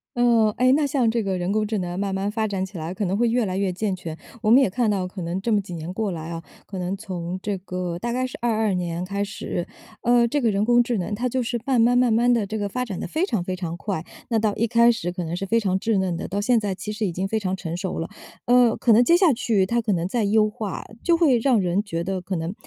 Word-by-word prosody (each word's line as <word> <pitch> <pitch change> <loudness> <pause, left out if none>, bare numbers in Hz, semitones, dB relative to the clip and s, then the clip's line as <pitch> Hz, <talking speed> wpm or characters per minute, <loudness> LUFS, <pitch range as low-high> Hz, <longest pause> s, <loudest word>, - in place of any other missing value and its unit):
呃 235 -3 +3
哎， 255 +1 +4
那 295 0 +3
像 265 -5 +1
这 230 -1 0
个 190 -2 -1
人 180 +2 -1
工 215 0 +1
智 215 +1 -2
能 180 -1 -3
慢 195 -1 -1
慢 195 +1 -1
发 220 0 -1
展 195 -2 -2
起 190 -1 -10
来 165 +2 -4
可 200 +1 -2
能 190 +3 0
会 235 0 +2
越 240 -1 +1
来 185 -1 -3
越 195 -1 0
健 195 +1 -2
全。 165 -3 -7 0.2
我 215 - +2
们 260 +4 +8
也 220 - +3
看 235 +2 0
到 190 -3 -1
可 185 0 -8
能 170 +2 -2
这 230 +3 0
么 205 - +3
几 180 -2 -9
年 165 +1 -5
过 210 -1 -1
来 160 -1 -6
啊， 165 0 -6 0.2
可 195 - -7
能 180 +2 -2
从 185 -3 -5
这 200 -1 -2
个 180 -2 -4
大 235 +3 -3
概 255 +1 0
是 255 - -9
22 220 -3 +1
年 175 0 -2
开 200 +1 -2
始， 195 -3 -4 0.4
呃， 240 0 +4
这 290 +5 0
个 230 -3 +2
人 200 +1 +1
工 240 +1 +5
智 235 -2 -1
能 190 +3 -2
它 245 +4 -1
就 260 +2 0
是 240 0 -2
慢 260 -3 +2
慢 245 +2 +4
慢 250 -2 +4
慢 240 +2 +4
地， 225 -4 +1
这 220 +2 -4
个 205 -1 -1
发 250 +5 -2
展 200 -7 -5
得 - - -4
非 320 +4 0
常 225 - -1
非 185 0 -3
常 170 -2 -5
快。 180 -3 -3 0.3
那 230 - +2
到 215 -1 +1
一 230 - +1
开 235 +1 +5
始 175 -7 -3
可 180 -1 -4
能 165 +1 -3
是 195 - -3
非 230 +4 +2
常 190 -2 0
稚 220 -1 +1
嫩 185 -3 0
的， - - -5
到 200 +2 -2
现 235 +2 +3
在 200 -3 -2
其 210 +3 -6
实 215 0 -2
已 180 - -1
经 185 +3 -2
非 220 +2 -1
常 190 -2 -2
成 170 -2 -5
熟 185 0 -3
了。 165 - -3 0.4
呃， 245 -2 +5
可 240 - +2
能 225 +3 +7
接 340 - +5
下 350 -4 +5
去 225 -5 +1
它 235 +4 0
可 215 -3 0
能 170 -1 -1
再 230 -2 0
优 215 +1 +3
化， 210 -2 -5 0.2
就 340 - +5
会 310 -8 +4
让 230 -3 +3
人 180 +2 +1
觉 170 -4 -3
得 190 +1 -2
可 185 +1 -4
能， 165 +2 -3
205 Hz, 315 characters per minute, -23 LUFS, 185-235 Hz, 0.4 s, 们